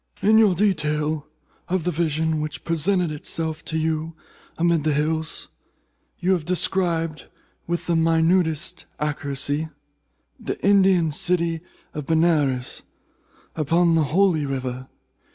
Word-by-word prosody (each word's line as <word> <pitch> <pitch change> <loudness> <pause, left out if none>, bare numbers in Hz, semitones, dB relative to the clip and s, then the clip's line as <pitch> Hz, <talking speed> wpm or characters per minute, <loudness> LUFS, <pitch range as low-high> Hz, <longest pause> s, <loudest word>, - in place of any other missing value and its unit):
"In 220 +2 +6
your 205 -5 +5
detail 155 -5 0 0.4
of 185 -1 0
the 180 - 0
vision 160 -1 0
which 150 -1 -5
presented 170 +1 +1
itself 160 +1 -3
to 160 - -3
you 160 0 -2 0.4
amid 170 -2 +2
the 155 -1 +1
hills, 160 +2 -2 0.7
you 185 - 0
have 180 -4 +1
described, 170 -2 -1 0.4
with 170 0 -2
the 170 - +1
minutest 165 0 +2
accuracy, 145 +1 -2 0.7
the - - -4
Indian 190 -5 +4
city 170 +1 +1 0.3
of 150 -2 -6
Benares, 155 -6 +1 0.7
upon 165 +2 +2
the 160 -2 +3
Holy 170 0 +2
River. 130 -2 -4
160 Hz, 115 wpm, -23 LUFS, 150-175 Hz, 0.7 s, In